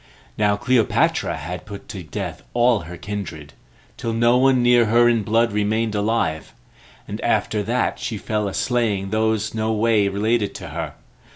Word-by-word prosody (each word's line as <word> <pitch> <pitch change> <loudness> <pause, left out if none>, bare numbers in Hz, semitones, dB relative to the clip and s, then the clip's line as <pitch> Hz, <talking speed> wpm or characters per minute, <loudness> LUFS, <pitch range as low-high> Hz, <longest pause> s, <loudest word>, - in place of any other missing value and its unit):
Now 105 -1 +2
Cleopatra 120 +2 +1
had 90 +7 -7
put 100 -1 -9
to 95 - -6
death 80 - -6
all 120 -2 +4
her 85 0 -9
kindred, 85 -7 -6 0.4
till 115 - -3
no 120 +1 +3
one 130 -1 +4
near 120 -1 +5
her 120 +2 +4
in 115 -2 +3
blood 115 +3 +2
remained 105 +2 0
alive, 105 -7 -1 0.5
and - - -6
after 105 - +1
that 120 +4 -1
she 110 - -3
fell 105 0 -2
a 100 - -4
slaying 105 -6 0
those 110 -1 0
no 110 0 -1
way 110 -2 +2
related 105 +2 0
to - - -7
her. - - -5
110 Hz, 165 wpm, -22 LUFS, 100-115 Hz, 0.5 s, near